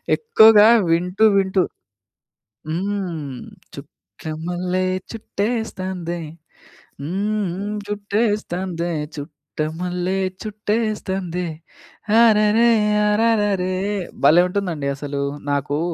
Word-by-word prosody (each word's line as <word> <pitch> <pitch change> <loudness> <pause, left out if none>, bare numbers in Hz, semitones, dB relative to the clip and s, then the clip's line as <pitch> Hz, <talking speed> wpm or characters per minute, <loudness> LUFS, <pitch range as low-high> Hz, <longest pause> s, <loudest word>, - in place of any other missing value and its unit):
ఎక్కువగా 220 - +6 0.2
వింటూ 180 +5 +2
వింటూ 190 -1 +2 1.1
హ్మ్. 170 -6 -3 0.3
'చుట్టమల్లే 170 - -5 0.3
చుట్టేస్తాందే, 195 -6 -3 0.8
హ్మ్ 200 +7 -2
హ్మ్. 205 +3 -4
చుట్టేస్తాందే 200 -4 -2 0.2
చుట్టమల్లే 165 +5 -4 0.3
చుట్టేస్తాందే 205 -4 -2 0.7
అరెరె 220 +1 +5 0.4
అరరెరే' 210 -4 +1 0.5
భలే 160 +5 +7
ఉంటుందండి 175 -7 -2
అసలు. 140 0 -4 0.3
నాకూ 145 +1 -1
185 Hz, 65 wpm, -21 LUFS, 165-210 Hz, 1.1 s, భలే